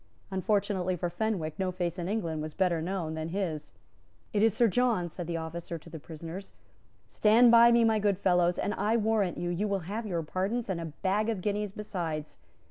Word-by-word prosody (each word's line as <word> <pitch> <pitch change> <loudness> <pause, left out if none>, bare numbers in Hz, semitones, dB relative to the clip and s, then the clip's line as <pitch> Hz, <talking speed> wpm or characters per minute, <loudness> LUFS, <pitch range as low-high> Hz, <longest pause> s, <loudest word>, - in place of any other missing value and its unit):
Unfortunately 190 -2 0
for 175 0 -3
Fenwick, 175 -4 -2
no 190 -1 0
face 180 -1 -3
in 175 +1 -3
England 170 -8 -2
was 155 0 -6
better 180 -4 +1
known 170 -2 -2
than 160 0 -3
his. 165 -6 -3 0.6
"It 205 - +2
is 225 +1 +5
Sir 230 +3 +3
John," 225 -5 +1
said 170 0 -6
the 170 -1 -2
officer 165 +1 -5
to 165 +1 -14
the 160 - -7
prisoners: 165 +5 -8 0.5
"Stand 230 +3 +5
by 235 0 +8
me, 235 0 +5
my 220 -1 +3
good 205 -2 +2
fellows, 180 -2 +2
and, 205 - -1
I 220 +2 +1
warrant 215 -4 +1
you, 175 0 -2
you 195 +5 -1
will 200 -2 -1
have 215 +4 -4
your 170 -4 -1
pardons, 195 +7 -2
and 170 -3 -2
a - - -4
bag 195 +7 -1
of 215 -5 -2
guineas 205 +1 -1
besides." 170 -7 -5
185 Hz, 205 wpm, -29 LUFS, 170-210 Hz, 0.6 s, by